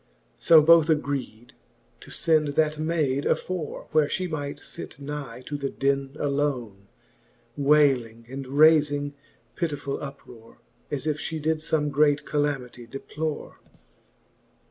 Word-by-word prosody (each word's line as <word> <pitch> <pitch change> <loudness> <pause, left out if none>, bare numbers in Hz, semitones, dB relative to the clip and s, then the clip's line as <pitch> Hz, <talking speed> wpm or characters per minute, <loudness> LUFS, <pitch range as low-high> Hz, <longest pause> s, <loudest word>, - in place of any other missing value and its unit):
So 160 -2 +7
both 165 0 +6
agreed, 140 -6 -2 0.5
to - - -14
fend 155 -2 +2
that 155 -1 +1
mayd 155 -4 0
afore. 180 -5 -2
Where 155 -1 +3
flie 185 - -1
might 145 -4 -4
fit - - -8
nigh 140 -4 -6
to 145 - -4
the 140 -1 -3
den 135 0 -1
alone, 130 -9 -2 0.7
Wayling, 135 -6 +2
and 135 +2 -6
rayfing 145 0 +4 0.4
pittifull 145 -5 -3
uprore, 130 -5 -11 0.3
As 145 -1 -3
if 155 -1 0
Ihe 160 - -3
did 155 +1 0
fome 150 -1 0
great 145 0 +3
calamitie 135 -5 -2
deplore. 150 +3 -5
145 Hz, 120 wpm, -25 LUFS, 135-155 Hz, 0.7 s, So